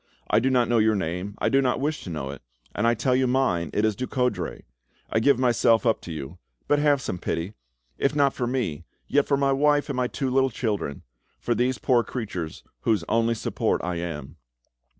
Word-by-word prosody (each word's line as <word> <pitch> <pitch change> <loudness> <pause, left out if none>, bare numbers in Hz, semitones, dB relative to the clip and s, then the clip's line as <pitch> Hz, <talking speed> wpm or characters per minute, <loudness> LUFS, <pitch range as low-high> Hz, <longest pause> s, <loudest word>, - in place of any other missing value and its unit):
I 105 - +5
do 130 +3 +1
not 125 -3 +3
know 120 0 +3
your 110 0 +3
name, 90 +2 -3
I - - +1
do 135 - +4
not 125 -2 +1
wish 150 +2 -2
to - - -7
know 70 -5 -4
it, 70 - -10 0.3
and 110 +3 +1
I 120 - +3
tell 125 +3 +1
you 130 0 +2
mine, 105 - +1
it 105 - +1
is 110 -2 +1
Ducoudray. 125 +1 -2 0.5
I 110 - +2
give 140 +3 +4
myself 120 -2 +3
up 115 -2 +2
to 85 - -8
you, 80 +2 -7 0.3
but 145 - +3
have 145 -3 +3
some 90 - -3
pity!—if 60 - -4
not 140 -2 +3
for 120 - -2
me, 115 - -2 0.2
yet 145 0 +2
for 140 - +2
my 140 0 +2
wife 145 +2 +2
and 135 - -2
my 125 -1 +1
two 135 0 -3
little 135 +1 +3
children—for 100 - -4
these 125 +1 +1
poor 120 +3 +2
creatures 95 -12 -5 0.2
whose 105 - +1
only 115 +1 +2
support - - -1
I 90 0 -2
am!" 80 -3 -6
115 Hz, 205 wpm, -25 LUFS, 90-130 Hz, 0.5 s, I